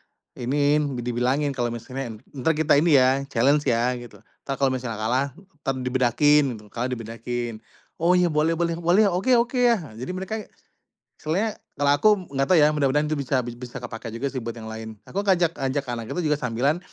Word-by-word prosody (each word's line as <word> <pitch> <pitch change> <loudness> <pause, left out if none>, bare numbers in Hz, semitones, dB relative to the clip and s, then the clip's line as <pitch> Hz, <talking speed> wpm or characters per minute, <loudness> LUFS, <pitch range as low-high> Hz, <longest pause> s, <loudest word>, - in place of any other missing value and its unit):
diiniin 145 +1 0
dibilangin 125 +4 0
kalau 120 -2 -1
misalnya, 120 -1 -6 0.2
"entar 135 +3 0
kita 155 0 +3
ini 150 -1 +5
ya 130 +2 +3
challenge 140 +5 +3
ya 120 0 +2
gitu 120 -1 -11 0.3
entar 135 -1 -4
kalau 135 - +4
misalnya 120 -4 -4
kalah 125 +5 +1
entar 160 -8 -6
dibedakin" 130 +4 +3
gitu 105 -1 -12
kalah 120 +4 -3
dibedakin, 115 -1 -5 0.4
"oh 170 +2 +4
ya 180 - +4
boleh 155 +1 +1
boleh 170 -1 0
boleh 180 +5 +4
oke 190 +6 0
oke 240 +2 0
yah" 240 -3 +4
nah 145 -9 -11
jadi 125 +9 -6
mereka, 190 +3 -4 0.8
soalnya 195 +8 -1 0.2
kalau 145 -1 +2
aku 215 - +5 0.3
gak 135 - +2
tau 185 - +5
ya 150 -1 +6
mudah-mudahan 150 0 +1
itu 155 - 0
bisa 130 -2 0
bi 120 - -5
bisa 125 0 -9
kepake 115 -1 -7
juga 135 +4 -2
sih 130 - -3
buat 115 -1 -5
yang 110 -1 -8
lain 110 0 -7 0.2
aku 195 - -1
ngajak 175 -4 +3
ngajak 135 +1 -1
anak 115 -2 -5
itu 180 - -1
juga 150 - +3
sambilan, 125 +6 0
135 Hz, 195 wpm, -24 LUFS, 120-155 Hz, 0.8 s, ya